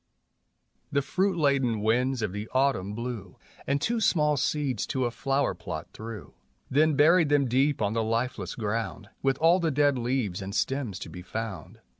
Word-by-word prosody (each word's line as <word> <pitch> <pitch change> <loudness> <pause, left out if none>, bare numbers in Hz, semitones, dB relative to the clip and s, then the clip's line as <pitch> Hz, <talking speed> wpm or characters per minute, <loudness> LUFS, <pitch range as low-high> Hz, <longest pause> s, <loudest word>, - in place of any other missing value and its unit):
The 140 -1 +1
fruit 185 +6 0
laden 135 -7 +2
winds 125 +2 +1
of 105 - -1
the 105 +2 -5
autumn 130 -7 +1
blew 115 -6 -6 0.3
And 140 +1 +1
two 230 +7 0
small 150 -7 +3
seeds 140 -4 -1
to 130 -1 0
a 120 - -1
flower 135 +3 0
plot - - -6
threw, 110 -3 -8 0.4
Then 155 +2 +4
buried 160 +2 +5
them 145 -2 +3
deep 130 0 +2
on 100 +1 0
the 115 - +1
lifeless 115 -4 -2
ground 105 -2 -3
With 135 -1 +1
all 165 +4 +4
the 165 -2 +1
dead 145 -2 +2
leaves 120 -6 -1
and 100 +1 -5
stems 130 -8 -1
to - - -6
be 90 +2 -9
found. 110 +1 -6
130 Hz, 175 wpm, -27 LUFS, 110-145 Hz, 0.4 s, buried